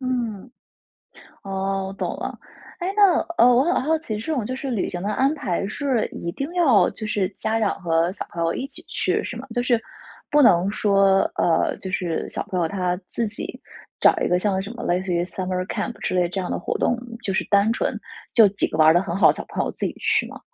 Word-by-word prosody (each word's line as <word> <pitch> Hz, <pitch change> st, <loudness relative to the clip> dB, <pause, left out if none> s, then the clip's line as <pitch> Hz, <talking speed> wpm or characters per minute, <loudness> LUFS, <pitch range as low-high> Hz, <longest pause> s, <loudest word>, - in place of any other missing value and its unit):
嗯。 245 Hz, -4 st, -3 dB, 0.9 s
哦， 195 Hz, 0 st, -2 dB
我 195 Hz, -, -6 dB
懂 -, -, -3 dB
了。 -, -, -5 dB, 0.4 s
诶， 365 Hz, -, -1 dB
那， 405 Hz, -4 st, +5 dB, 0.2 s
呃， 235 Hz, -, +7 dB
我 250 Hz, +2 st, +4 dB
很 345 Hz, -1 st, +1 dB
好 320 Hz, +3 st, +2 dB
奇， 220 Hz, -10 st, -4 dB
这 270 Hz, +9 st, -4 dB
种 255 Hz, -8 st, -1 dB
就 255 Hz, -, -3 dB
是 270 Hz, +1 st, -5 dB
旅 220 Hz, -6 st, -1 dB
行 175 Hz, -, -5 dB
的 200 Hz, -, -2 dB
安 270 Hz, +6 st, +2 dB
排 195 Hz, -, -2 dB
是 255 Hz, +1 st, 0 dB
一 170 Hz, -, -5 dB
定 275 Hz, -, -4 dB
要， 305 Hz, -, +4 dB
就 215 Hz, -, -7 dB
是 205 Hz, -3 st, 0 dB
家 220 Hz, +3 st, -2 dB
长 210 Hz, -3 st, -1 dB
和 165 Hz, 0 st, +1 dB
小 195 Hz, -, -6 dB
朋 170 Hz, -1 st, -3 dB
友 165 Hz, -, +1 dB
一 265 Hz, -, -4 dB
起 275 Hz, -, -12 dB
去， -, -, 0 dB
是 -, -, -5 dB
吗？ -, -, -8 dB
就 245 Hz, -, 0 dB
是 240 Hz, -2 st, +2 dB, 0.5 s
不 295 Hz, 0 st, +4 dB
能 185 Hz, -7 st, +5 dB
说， 195 Hz, -2 st, +3 dB, 0.2 s
呃， 165 Hz, -2 st, +2 dB
就 190 Hz, -, -7 dB
是 175 Hz, -4 st, -2 dB
小 -, -, -4 dB
朋 185 Hz, -, -1 dB
友， 170 Hz, -, +1 dB
他 180 Hz, -1 st, -1 dB
自 230 Hz, -, -2 dB
己 210 Hz, +4 st, -7 dB, 0.4 s
找 -, -, +6 dB
一 -, -, +1 dB
个 180 Hz, -, +3 dB
像 190 Hz, -1 st, 0 dB
什 200 Hz, +3 st, -7 dB
么 235 Hz, -, -7 dB
类 175 Hz, +1 st, +1 dB
似 185 Hz, -2 st, -2 dB
于 170 Hz, 0 st, +1 dB
Summer 185 Hz, 0 st, -3 dB
Camp 240 Hz, -, -3 dB
之 -, -, -2 dB
类 180 Hz, -1 st, +2 dB
这 190 Hz, -, -3 dB
样 180 Hz, -, -4 dB
的 -, -, -2 dB
活 -, -, -2 dB
动， 245 Hz, -, +1 dB, 0.3 s
就 195 Hz, -, -1 dB
是 -, -, +1 dB
单 200 Hz, +2 st, +3 dB
纯 -, -, -1 dB, 0.4 s
就 225 Hz, -3 st, +7 dB
几 195 Hz, 0 st, -1 dB
个 -, -, -5 dB
玩 155 Hz, 0 st, +6 dB
儿 160 Hz, -, +6 dB
得 175 Hz, -, +4 dB
很 180 Hz, -3 st, -4 dB
好 195 Hz, -, +6 dB
的 -, -, +2 dB
小 -, -, -6 dB
朋 -, -, -1 dB
友 -, -, -3 dB
自 -, -, -4 dB
己 -, -, -2 dB
去 -, -, +1 dB
吗？ -, -, -10 dB
200 Hz, 285 characters per minute, -23 LUFS, 180-245 Hz, 0.9 s, 呃